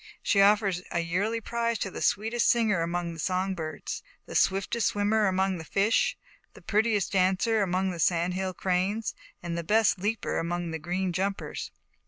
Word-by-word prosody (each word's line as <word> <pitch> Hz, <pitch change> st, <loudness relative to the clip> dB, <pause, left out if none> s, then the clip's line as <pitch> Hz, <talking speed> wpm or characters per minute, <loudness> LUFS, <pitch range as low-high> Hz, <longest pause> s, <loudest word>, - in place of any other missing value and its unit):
She 200 Hz, -, +3 dB
offers 200 Hz, -3 st, +3 dB
a 170 Hz, -, 0 dB
yearly 200 Hz, +7 st, -1 dB
prize 235 Hz, +1 st, -1 dB
to 195 Hz, -, -3 dB
the -, -, -7 dB
sweetest 225 Hz, +3 st, +1 dB
singer 220 Hz, -7 st, +3 dB
among 170 Hz, 0 st, -2 dB
the 165 Hz, -, -10 dB
song 185 Hz, +3 st, 0 dB
birds; 160 Hz, -3 st, -5 dB, 0.2 s
the -, -, -9 dB
swiftest 195 Hz, +4 st, +2 dB
swimmer 210 Hz, +1 st, +2 dB
among 190 Hz, -1 st, +1 dB
the -, -, -6 dB
fish; 200 Hz, +7 st, +1 dB, 0.4 s
the -, -, -13 dB
prettiest 210 Hz, -2 st, +1 dB, 0.3 s
;cer 225 Hz, -2 st, +2 dB
among 190 Hz, 0 st, 0 dB
the 175 Hz, -, -7 dB
Sand 170 Hz, +2 st, +2 dB
Hill 185 Hz, 0 st, -3 dB
Cranes, 190 Hz, +5 st, 0 dB, 0.3 s
and 170 Hz, -1 st, -4 dB
best 215 Hz, -3 st, +3 dB
leaper 210 Hz, +3 st, -1 dB
among 175 Hz, 0 st, -2 dB
the 160 Hz, -, -4 dB
Green 180 Hz, +3 st, -2 dB
umpers." 195 Hz, +2 st, -3 dB
190 Hz, 170 wpm, -28 LUFS, 175-210 Hz, 0.4 s, She